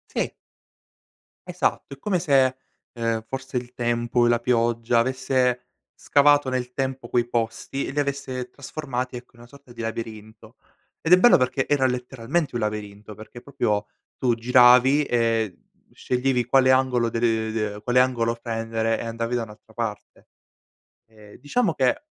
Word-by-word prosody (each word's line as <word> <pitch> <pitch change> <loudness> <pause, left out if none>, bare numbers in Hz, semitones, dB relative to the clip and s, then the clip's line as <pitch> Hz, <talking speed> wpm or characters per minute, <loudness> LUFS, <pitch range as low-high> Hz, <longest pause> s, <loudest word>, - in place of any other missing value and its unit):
Sì. - - -1 1.2
Esatto. - - -2
È 140 - -13
come 195 +1 0
se, 135 -6 +3 0.4
ehm, 115 -2 -2
forse 135 0 -5
il 125 0 -6
tempo 120 0 +1
e - - +3
la 120 0 +3
pioggia 120 -1 +1
avesse 125 0 +1 0.3
scavato 145 -1 +3
nel 125 -1 -3
tempo 135 -1 -3
quei 120 -1 0
posti, 120 +3 -2
e - - -5
li 145 - -2
avesse 135 -3 -3
trasformati 130 -2 -5
ecco, 120 0 -10
in 120 - -21
una 120 - -14
sorta 140 0 -17
di 120 -1 -8
labirinto. 110 0 -7 0.5
Ed 165 - +3
è 180 - +8
bello 240 +5 +7
perché 130 +1 0
era 145 -2 +2
letteralmente 125 +3 -2
un 120 - -1
labirinto, 105 0 -5
perché 110 +3 -12
proprio 120 -7 -1 0.3
tu 125 -2 +1
giravi 125 +4 +5
e 115 -6 0 0.4
sceglievi 125 -1 -1
quale 130 +1 +4
angolo 130 -3 +2
de 115 - -3
le 110 -2 0
de 105 -2 -3
quale 125 0 +3
angolo 120 -3 +2
prendere, 115 -1 -2
e - - -5
andavi 115 +1 -3
da 120 - -1
un'altra 110 0 -14
parte. 110 -3 -6 0.8
E 105 -2 -17
diciamo 165 - 0
che, 130 - +1
125 Hz, 155 wpm, -24 LUFS, 115-130 Hz, 1.2 s, è